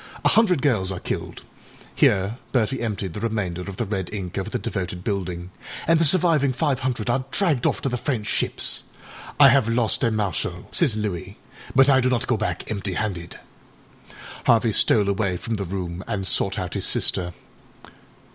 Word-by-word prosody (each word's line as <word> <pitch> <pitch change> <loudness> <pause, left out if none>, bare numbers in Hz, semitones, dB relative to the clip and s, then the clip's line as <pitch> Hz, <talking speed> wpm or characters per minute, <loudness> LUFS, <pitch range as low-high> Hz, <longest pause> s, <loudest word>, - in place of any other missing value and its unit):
A - - +6
hundred 185 - +3
girls 105 -10 +1
are 90 - -4
killedââhere 100 +5 -2
Bertie 130 +1 0
emptied 100 -6 -3
the - - -5
remainder 105 -6 -2
of 95 +1 -7
the 120 - -1
red 95 -3 -3
ink 95 -4 -5
over 95 -1 -3
the - - -2
devoted 90 -1 -4
buildingââand 95 - -2
the - - +3
surviving 155 -4 +4
five 140 -1 0
hundred 120 -4 -2
are 130 +2 +1
dragged 155 -8 +1
off - - -1
to 135 - +1
the 125 - -2
French 120 -7 -2
ships. - - -1 0.5
âI 140 -3 +9
have 130 -4 +3
lost 115 0 +1
a 120 - +4
Marshal,â 100 - -3
says 110 -5 +3
Louis, 100 -2 -4 0.4
âbut 135 0 +6
I 135 -2 +5
do 130 - +2
not 125 0 0
go 125 - +1
back 110 0 -3
empty 100 -2 -2
handed.ââ 90 -4 -8 0.3
Harvey 115 -1 +4
stole 105 -1 +4
away 100 -2 0
from 115 +4 -3
the 100 - -3
room, 90 -1 -5
and 100 -4 -2
sought - - +1
out - - -4
his - - -1
sister. 90 -1 0
110 Hz, 175 wpm, -23 LUFS, 95-130 Hz, 0.5 s, âI